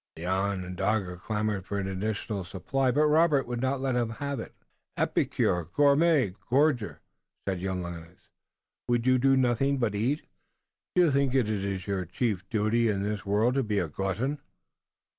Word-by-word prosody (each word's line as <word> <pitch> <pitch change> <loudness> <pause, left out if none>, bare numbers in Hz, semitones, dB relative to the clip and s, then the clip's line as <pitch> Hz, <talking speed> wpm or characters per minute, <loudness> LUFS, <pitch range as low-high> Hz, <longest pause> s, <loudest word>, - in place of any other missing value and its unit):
The 80 - -7
Onondaga 95 0 -1
clamored 105 0 -2
for 100 - -2
an 100 -1 -2
additional 100 +1 -3
supply, 115 +9 -1
but 145 +5 +3
Robert 150 -2 +4
would 120 -1 -4
not 130 +1 0
let 135 -2 0
him 120 -2 +1
have 140 +3 -4
it. - - -8 0.4
"Epicure! 90 -2 +1
Gourmand! 140 - +3
Gorger!" 130 -4 +1 0.5
said 95 -2 -1
young 95 -1 -2
Lennox. 85 0 -9 0.6
"Would 120 -1 +1
you 130 0 +4
do 135 +1 +4
nothing 130 +2 +2
but 115 -5 0
eat? 120 +9 0 0.7
Do 180 - +6
you 165 - +3
think 135 -1 +1
it 130 -4 +3 0.4
your 95 -2 -2
chief 95 +1 -2
duty 110 +2 +2
in 100 -2 0
this 105 0 -3
world 105 +5 +2
to 135 - +2
be 105 -4 -1
a 90 - +1
glutton?" 95 - -2
110 Hz, 160 wpm, -28 LUFS, 95-135 Hz, 0.7 s, Do